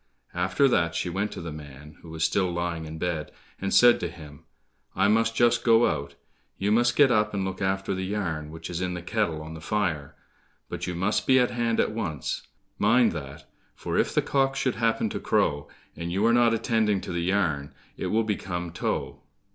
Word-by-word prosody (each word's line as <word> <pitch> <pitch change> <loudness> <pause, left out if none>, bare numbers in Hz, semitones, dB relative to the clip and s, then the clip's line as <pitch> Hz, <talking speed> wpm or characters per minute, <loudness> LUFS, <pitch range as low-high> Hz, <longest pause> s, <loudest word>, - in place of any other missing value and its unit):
After 90 +10 +2
that 85 -9 +1
she 85 +1 -2
went 100 +4 -2
to - - -7
the 85 -1 -6
man 75 0 -11
who 85 - -12
was 80 0 -3
still 95 0 +1
lying 85 -2 -3
in 80 0 -7
bed, 80 -2 -3 0.3
and 95 0 -2
said 120 +5 +6
to 85 - -2
him, 75 -4 -13 0.5
"I 95 +2 +3
must 115 +2 +2
just 120 0 +3
go 115 0 +5
out, 70 -1 -2 0.4
you 100 +2 0
must 120 +2 +3
get 140 -3 +5
up 105 -2 +2
and 95 -1 -1
look 95 0 -5
after 95 0 0
the 95 0 -3
yarn 85 -7 -3
which 80 +1 -8
is 85 +1 -3
in 90 -1 -2
the 85 - -6
kettle 85 -6 -1
on 80 +1 -8
the 80 - -9
fire, 80 -8 -2 0.5
but - - -5
you 90 - -3
must 95 +5 0
be 130 - +6
at 125 -1 +3
hand 120 -1 0
at - - +2
once; 85 - -3 0.4
mind 115 +3 +4
that, 70 -2 -8 0.3
for - - -4
if - - +2
the - - +1
cock 135 -1 +1
should 130 -2 0
happen 115 0 +1
to - - -3
crow, 70 0 0 0.3
and 85 0 -5
you 100 +4 +1
are 115 - +4
not 120 -1 +5
attending 110 -3 +1
to - - -6
the 85 -1 -2
yarn, 85 -6 0 0.2
it - - -4
will 115 +1 +2
become 90 -5 -3
tow." 85 - -3
95 Hz, 210 wpm, -26 LUFS, 80-110 Hz, 0.5 s, said